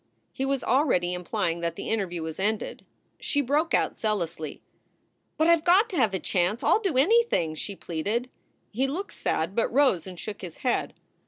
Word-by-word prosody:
He 270 - -2
was 275 -1 -1
already 235 - +2
implying 170 -1 -2
that 170 0 -2
the - - -6
interview 180 -6 -1
was 160 +1 -6
ended. 210 +2 -2 0.4
She 285 - -1
broke 290 +5 +2
out - - 0
zealously: 170 -8 -3 0.7
"But 315 - +3
I 335 - +7
ve - - -10
got 380 +7 +4
to - - -4
have 220 -7 +2
a - - -1
chance. 185 +6 0
I - - +3
ll - - +5
do 385 -11 -1
anything," 350 - +3
she 200 +5 -5
pleaded. 205 +10 -2 0.4
He 260 +5 0
looked 350 +9 -4
sad, 165 +5 -1
but 230 - +1
rose 255 - +3
and 180 -2 -9
shook 210 -1 -6
his 175 -4 -7
head. 250 - 0
220 Hz, 190 wpm, -27 LUFS, 175-285 Hz, 0.7 s, I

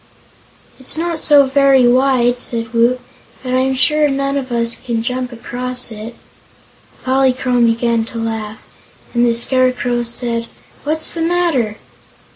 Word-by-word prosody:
"It's 260 +4 -5
not 335 0 -2
so 290 -2 +6
very 270 -2 +4
wide," 250 -1 +2
said 230 -1 -3
Woot, 235 +2 +2 0.4
"but 255 -1 -3
I'm 260 +1 +1
sure 300 +3 +2
none 275 0 -1
of 265 -2 -4
us 235 -1 0
can 235 -3 -4
jump 250 +1 -3
across 250 +1 -3
it." 220 +2 -8 0.9
Polychrome 255 -2 +2
began 230 0 +1
to 230 - -9
laugh, 220 -1 -5 0.5
and 240 0 +2
the 235 -1 +2
Scarecrow 250 0 +1
said: 235 0 -2 0.4
"What's 315 +2 0
the 335 - -4
matter?" 325 -11 0
250 Hz, 135 wpm, -16 LUFS, 235-270 Hz, 0.9 s, so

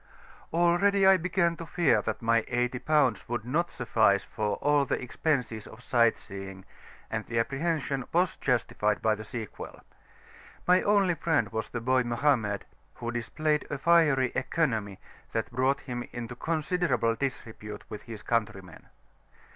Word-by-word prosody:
Already 175 +4 +3
I 190 0 +7
began 170 -1 +1
to 165 - -7
fear 145 -13 +3
that 110 +2 -4
my 115 0 +3
eighty 125 +1 -1
pounds 145 -8 +1
would 120 -2 -3
not 165 +8 0
suffice 110 -4 +2
for 105 -2 -2
all 145 0 +2
the 135 - -1
expenses 125 -5 -2
of 125 +3 -13
sight 115 -2 +3
seeing, 95 -3 -9 0.5
and 115 -1 -2
the 115 - -3
apprehension 135 +1 -1
was 180 +2 +2
justified 110 -4 0
by 110 - +4
the 110 0 -6
sequel. 110 -2 -7 0.9
My 180 +1 +5
only 200 -3 +3
friend 160 - 0
was 110 -1 -3
the 120 - -4
boy 130 +2 +3
Mohammed, 120 -4 0 0.3
who 120 0 -4
displayed 150 +6 -1
a 145 - -3
fiery 150 -5 +4
economy 110 - -1 0.4
that 115 +1 -2
brought 130 +3 +1
him 120 -2 -5
into 120 0 -6
considerable 160 -5 0
disrepute 110 -4 -5
with 105 - -7
his 110 -2 -8
countrymen. 100 -7 -3
125 Hz, 145 wpm, -28 LUFS, 115-155 Hz, 0.9 s, I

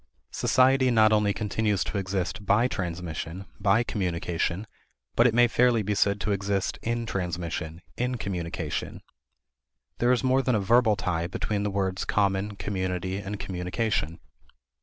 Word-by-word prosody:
Society 130 0 +3
not 110 -2 +5
only 105 -1 +3
continues 105 -1 0
to 100 - -3
exist 95 +1 -3
by 105 +5 +3
transmission, 90 -2 -4
by 105 +4 +3
communication, 90 -2 -2 0.5
but 115 - +6
it 115 - +1
may 120 0 +6
fairly 120 -1 +3
be 105 +1 -1
said 100 0 +2
to 105 - -1
exist 100 -1 -1
in 115 0 -2
transmission, 85 -4 -4
in 125 +1 -1
communication. 90 -6 -4 1.0
There 120 +1 +3
is 125 - +2
more 130 +1 +3
than 125 -2 +1
a - - +2
verbal 110 +2 +4
tie 85 -4 -1
between 105 +3 -2
the 105 - 0
words 95 -1 -1
common, 100 0 0
community, 95 -2 -2
and 100 0 -5
communication. 90 -2 -2
100 Hz, 145 wpm, -27 LUFS, 90-110 Hz, 1.0 s, but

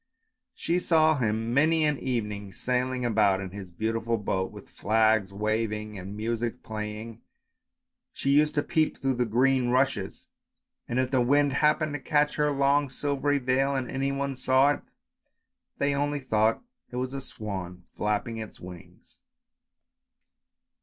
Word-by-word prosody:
She 175 +1 0
saw 160 -4 +3
him 115 0 -1
many 155 +3 +3
an 150 -2 +1
evening 105 -6 -3
sailing 125 0 -1
about 105 -4 +3
in 95 -2 -6
his 95 -2 -8
beautiful 115 +4 -1
boat, 95 -2 -2
with - - -12
flags 110 -2 +2
waving 105 +1 -2
and 100 +2 -7
music 115 +1 -3
playing, 110 +1 -6 0.9
she 140 - -1
used 150 +2 +3
to 145 - +2
peep 155 -1 0
through 135 0 0
the 125 -1 0
green 125 +2 +2
rushes, 125 -6 0 0.6
and 120 - -2
if 130 0 +1
the 130 -2 +3
wind 140 +3 +3
happened 150 +1 +2
to 145 - -3
catch 150 +1 +1
her 150 0 +2
long 140 0 +2
silvery 145 +1 0
veil 135 +1 +1
and 130 -2 -2
any 135 +1 -1
one 140 0 -2
saw 130 +2 +4
it, - - -7 1.0
they 140 0 +1
only 145 +1 0
thought 110 -4 +1 0.3
it - - -9
was 130 +1 -2
a 135 - -4
swan 95 -8 -7
flapping 105 +2 -1
its 110 -1 -8
wings. 90 -1 -13
125 Hz, 150 wpm, -27 LUFS, 110-140 Hz, 1.0 s, saw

